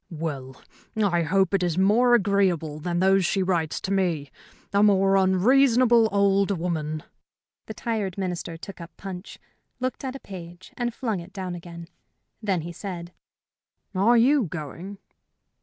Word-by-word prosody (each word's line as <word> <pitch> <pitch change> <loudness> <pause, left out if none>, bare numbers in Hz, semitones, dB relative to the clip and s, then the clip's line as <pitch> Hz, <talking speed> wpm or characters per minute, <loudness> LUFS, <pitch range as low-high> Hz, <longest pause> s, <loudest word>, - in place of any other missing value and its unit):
"Well, 145 -6 -5 0.4
I 195 -5 +2
hope 190 +3 +1
it 195 - +2
is 175 -2 0
more 230 +6 +5
agreeable 190 -8 +1
than 175 +2 -2
those 190 +1 +4
she 190 +2 +1
writes 170 -4 0
to 190 - -4
me. 165 -8 0 0.4
A 200 - +4
more 195 -2 +4
unreasonable 230 +4 +4
old 200 0 +3
woman 160 -5 -2 0.3
" - - -68
The 220 - -7
tired 210 -5 -3
Minister 175 -3 -4
took 185 +2 -10
up 170 - -8
Punch, 185 -2 -8 0.4
looked 255 +1 -3
at 265 0 -4
a - - -6
page, 175 -3 -11
and 240 -1 -2
flung 225 -5 -3
it 175 +2 -11
down 185 -2 -4
again. 170 -1 -9 0.5
Then 195 -6 0
he 170 +2 -6
said: 175 -1 -7 0.8
"Are 210 +6 +4
you 260 +2 +4
going?" 170 +5 -7
190 Hz, 155 wpm, -25 LUFS, 170-205 Hz, 0.8 s, more